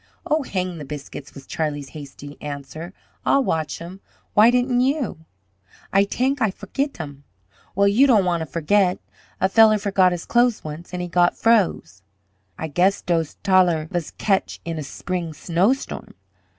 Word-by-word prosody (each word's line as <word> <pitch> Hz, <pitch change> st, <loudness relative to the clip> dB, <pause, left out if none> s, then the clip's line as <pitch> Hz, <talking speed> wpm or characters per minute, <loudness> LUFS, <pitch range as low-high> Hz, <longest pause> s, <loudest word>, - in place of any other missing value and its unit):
"Oh, 310 Hz, +1 st, +1 dB
hang 185 Hz, -, -3 dB
the -, -, -6 dB
biscuits!" 145 Hz, 0 st, -8 dB
was 135 Hz, -, -11 dB
Charlie's 145 Hz, -3 st, -3 dB
hasty 145 Hz, -1 st, -10 dB
answer. 145 Hz, +4 st, -7 dB, 0.3 s
"I'll 275 Hz, -, +3 dB
watch 160 Hz, -, -2 dB
'em. 175 Hz, +3 st, -9 dB, 0.3 s
Why 215 Hz, +2 st, +7 dB
didn't 245 Hz, 0 st, +2 dB
you?" 260 Hz, -, -1 dB, 0.7 s
"Ay 195 Hz, +1 st, +5 dB
tank 260 Hz, +6 st, -1 dB
Ay 220 Hz, -, +3 dB
fergit 275 Hz, +8 st, -4 dB
hem." 145 Hz, -3 st, -8 dB, 0.5 s
"Well, 200 Hz, +1 st, +4 dB
you 235 Hz, +8 st, +5 dB
don't 215 Hz, -7 st, +4 dB
want 175 Hz, -2 st, 0 dB
to 160 Hz, -, -4 dB
forget. 180 Hz, +5 st, +2 dB, 0.4 s
A 190 Hz, -, +3 dB
feller 215 Hz, +1 st, +6 dB
forgot 195 Hz, -3 st, +3 dB
his 175 Hz, -1 st, -4 dB
clothes 240 Hz, -1 st, +2 dB
once, 155 Hz, +3 st, -8 dB
an' 180 Hz, 0 st, -4 dB
he 180 Hz, -, -3 dB
got 175 Hz, 0 st, +2 dB
froze." 180 Hz, -, +1 dB, 0.6 s
"Ay 160 Hz, -, -4 dB
gass 180 Hz, +6 st, +2 dB
dose 165 Hz, -3 st, 0 dB
taller 180 Hz, -5 st, +3 dB
vas 175 Hz, -4 st, -2 dB
ketch 195 Hz, -2 st, 0 dB
in 165 Hz, -1 st, -3 dB
a -, -, -3 dB
sbring 170 Hz, +3 st, -4 dB
snowstorm. 190 Hz, -, -1 dB
180 Hz, 165 wpm, -22 LUFS, 155-215 Hz, 0.7 s, Why